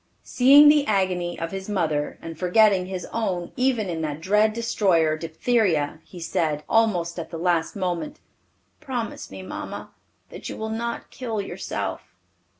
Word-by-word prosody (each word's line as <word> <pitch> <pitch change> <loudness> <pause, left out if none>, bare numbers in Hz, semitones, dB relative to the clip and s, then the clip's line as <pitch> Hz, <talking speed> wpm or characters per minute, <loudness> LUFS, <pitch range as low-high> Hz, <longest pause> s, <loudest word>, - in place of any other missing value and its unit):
Seeing 280 +4 +7
the 295 -1 +5
agony 185 -4 0
of 165 0 -4
his 195 +1 -6
mother, 155 -7 -1
and 165 0 -6
forgetting 185 +2 +3
his 185 -1 -5
own 185 -6 -2
even 250 -5 +1
in 165 -2 -3
that 150 -1 -3
dread 210 +5 +3
destroyer, 195 -9 +2
diphtheria, 165 -1 0
he 180 - -12
said, 155 -2 -1
almost 180 -7 +1
at 165 - -6
the 165 - -6
last 170 -1 0
moment, 190 - -3 0.6
"Promise 250 -7 -5
me, 95 -1 -9
mamma, 95 - -7 0.4
that - - -7
you - - -6
will 220 0 -4
not 235 +1 -4
kill 230 -4 -4
yourself." 195 - -5
185 Hz, 150 wpm, -24 LUFS, 165-225 Hz, 0.6 s, Seeing